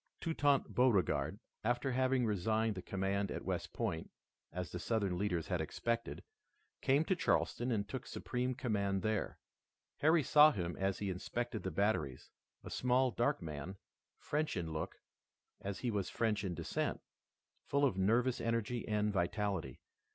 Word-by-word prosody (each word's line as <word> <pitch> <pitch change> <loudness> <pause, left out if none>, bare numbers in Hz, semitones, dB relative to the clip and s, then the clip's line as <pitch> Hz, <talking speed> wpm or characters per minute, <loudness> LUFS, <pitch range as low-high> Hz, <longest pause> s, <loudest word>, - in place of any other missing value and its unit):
Toutant 145 -4 +2
Beauregard, 120 -8 +2 0.2
after 120 +3 +1
having 130 0 +2
resigned 110 +2 +1
the 95 - -6
command 95 +1 -1
at - - -5
West - - -2
Point, 80 - -2 0.4
as 90 0 -4
the 90 - -4
Southern 100 -2 0
leaders 90 -3 0
had - - +1
expected, 115 0 -2 0.6
came 140 +4 +3
to 190 - +2
Charleston 125 -7 +1
and 100 -3 0
took 130 +5 -5
supreme 125 0 -2
command 100 -6 0
there. 110 -1 -1 0.6
Harry 155 +1 +4
saw 150 +3 +8
him 85 -4 -2
as 95 0 0
he 100 -2 -2
inspected 120 +5 -3
the 95 - -2
batteries, 80 - 0 0.3
a - - -8
small, 125 +1 +2
dark 120 0 0
man, 80 +4 -5 0.4
French 150 -6 -1
in 80 -3 -3
look, 80 - -3 0.6
as 100 -1 -5
he 120 - 0
was 100 -3 -1
French 110 -3 0
in 90 -3 -2
descent, - - -2 0.7
full 140 0 +3
of 130 - +2
nervous 115 +6 +2
energy 115 +1 -1
and 105 -1 +1
vitality. 95 - -1
110 Hz, 150 wpm, -36 LUFS, 95-125 Hz, 0.7 s, saw